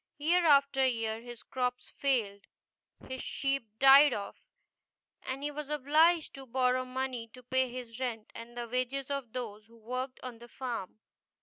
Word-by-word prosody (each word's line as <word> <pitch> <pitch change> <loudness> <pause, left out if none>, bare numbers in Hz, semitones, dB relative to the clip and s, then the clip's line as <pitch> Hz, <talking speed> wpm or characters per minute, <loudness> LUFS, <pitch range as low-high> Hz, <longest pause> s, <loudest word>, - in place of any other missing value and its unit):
Year 335 +3 +3
after 280 -2 +5
year 225 -3 0
his 240 -1 -10
crops 250 -1 -3
failed, 220 -8 -1 0.6
his 260 0 -5
sheep 275 -4 -1
died 275 +1 +8
off, 200 -1 -5 0.8
and 265 +2 -5
he 295 - -1
was 295 0 -6
obliged 305 +3 +3
to 270 -1 -10
borrow 255 +1 +1
money 255 -2 -3
to 250 - -13
pay 260 +1 +1
his 245 -1 -7
rent 230 -4 -4
and 235 +1 -10
the 240 0 -3
wages 255 +3 -2
of 275 -5 -3
those 220 -4 -5
who 230 0 -19
worked 255 +3 -4
on 245 -3 -7
the 240 - -12
farm. 240 -7 -5
255 Hz, 165 wpm, -31 LUFS, 235-275 Hz, 0.8 s, died